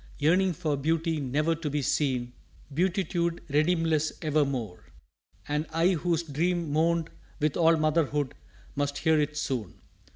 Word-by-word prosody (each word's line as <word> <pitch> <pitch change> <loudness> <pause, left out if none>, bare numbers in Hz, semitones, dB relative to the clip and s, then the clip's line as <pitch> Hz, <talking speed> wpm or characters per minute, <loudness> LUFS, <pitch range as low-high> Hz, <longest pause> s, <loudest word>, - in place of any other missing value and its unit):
Yearning 180 +6 +3
for 155 -3 -1
beauty 160 +3 0
never 150 +4 0
to 160 -1 -4
be 145 0 -1
seen 125 -4 0 0.4
Beatitude 175 0 0
redeemless 155 +1 +2
evermore! 140 - -1 0.6
"And 150 +2 -1
I 165 +3 +2
whose 170 -2 0
dream 165 +1 -1
mourned 165 +2 +1 0.3
with 150 -1 +1
all 165 -1 +4
motherhood 150 -3 +1 0.4
Must 145 0 -1
hear 160 0 +3
it 150 0 -2
soon! 125 -10 -3
155 Hz, 130 wpm, -28 LUFS, 145-165 Hz, 0.6 s, all